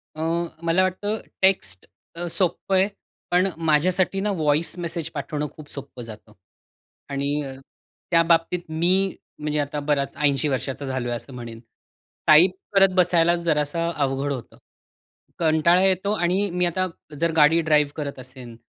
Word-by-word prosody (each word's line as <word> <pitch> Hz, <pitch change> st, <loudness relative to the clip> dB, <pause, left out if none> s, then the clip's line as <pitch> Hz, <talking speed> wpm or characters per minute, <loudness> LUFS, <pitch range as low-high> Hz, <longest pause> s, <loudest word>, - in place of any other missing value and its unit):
अ, 155 Hz, -, -6 dB, 0.4 s
मला 170 Hz, +3 st, +3 dB
वाटतं 205 Hz, +4 st, -2 dB, 0.2 s
टेक्स्ट 185 Hz, -, +2 dB, 0.3 s
अ, 175 Hz, +1 st, -4 dB
सोपं 185 Hz, +2 st, +1 dB
आहे. 190 Hz, +1 st, +4 dB, 0.4 s
पण 180 Hz, +2 st, +3 dB
माझ्यासाठीना 185 Hz, +5 st, +1 dB
व्हॉइस 155 Hz, -1 st, +1 dB
मेसेज 170 Hz, -1 st, -3 dB
पाठवणं 150 Hz, 0 st, -3 dB
खूप 155 Hz, -2 st, -12 dB
सोपं 140 Hz, -3 st, -7 dB
जातं. 110 Hz, -1 st, -11 dB, 0.8 s
आणि 140 Hz, 0 st, -2 dB, 0.8 s
त्या 165 Hz, -1 st, +5 dB
बाबतीत 165 Hz, +1 st, +2 dB
मी 165 Hz, +3 st, +1 dB, 0.5 s
म्हणजे 150 Hz, 0 st, -1 dB
आता 145 Hz, 0 st, -2 dB
बराच 145 Hz, -1 st, -1 dB
80 145 Hz, -1 st, +1 dB
वर्षांचा 135 Hz, +1 st, -3 dB
झालोय 130 Hz, -2 st, -3 dB
असं 130 Hz, +3 st, -9 dB
म्हणेन. 120 Hz, -2 st, -8 dB, 0.7 s
टाइप 165 Hz, +5 st, +7 dB, 0.2 s
करत 195 Hz, -1 st, +5 dB
बसायला 175 Hz, -1 st, +4 dB
जरासं 165 Hz, 0 st, 0 dB
अवघड 140 Hz, 0 st, -1 dB
होतं. 125 Hz, -4 st, -9 dB, 0.8 s
कंटाळा 165 Hz, +2 st, +3 dB
येतो 190 Hz, +1 st, +1 dB
आणि 190 Hz, +2 st, +1 dB
मी 180 Hz, 0 st, +1 dB
आता 185 Hz, +2 st, 0 dB, 0.3 s
जर 170 Hz, 0 st, +1 dB
गाडी 160 Hz, +2 st, +5 dB
ड्राइव्ह 150 Hz, -2 st, +2 dB
करत 140 Hz, -3 st, -5 dB
असेल 125 Hz, -2 st, -11 dB
160 Hz, 140 wpm, -23 LUFS, 140-175 Hz, 0.8 s, टाइप